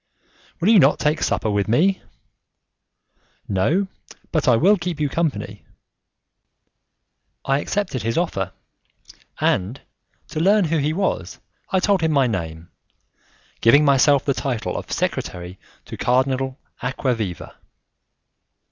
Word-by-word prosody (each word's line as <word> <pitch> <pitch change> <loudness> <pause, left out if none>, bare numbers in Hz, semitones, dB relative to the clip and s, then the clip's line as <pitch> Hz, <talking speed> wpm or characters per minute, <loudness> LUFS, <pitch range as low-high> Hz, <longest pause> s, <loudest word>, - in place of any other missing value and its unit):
"Will 180 +4 +2
you 225 -3 +7
not 140 -2 +5
take 150 +2 0
supper 110 - 0
with 100 -1 0
me?" 175 - +2 1.5
"No, 145 - +1 0.4
but 155 -3 0
I 125 - +6
will 185 - +5
keep 175 -4 -4
you 150 - +1
company." 165 -1 -3 1.8
I 135 +1 +2
accepted 190 - -2
his 115 +1 -2
offer, 100 - -1 0.9
and 100 +9 0 0.5
to - - -4
learn 200 +3 +4
who 160 0 0
he 145 +2 0
was, 190 +5 -2 0.3
I 190 - +2
told 195 -1 +2
him 160 -1 +1
my 140 -3 +3
name, 85 -7 -4 0.9
giving 140 +6 +5
myself 140 0 +4
the 140 - +2
title 125 -5 -3
of - - -6
secretary 90 +1 -3 0.3
to - - -8
Cardinal 130 +1 0 0.2
Acquaviva. 120 - -3
140 Hz, 120 wpm, -21 LUFS, 115-165 Hz, 1.8 s, you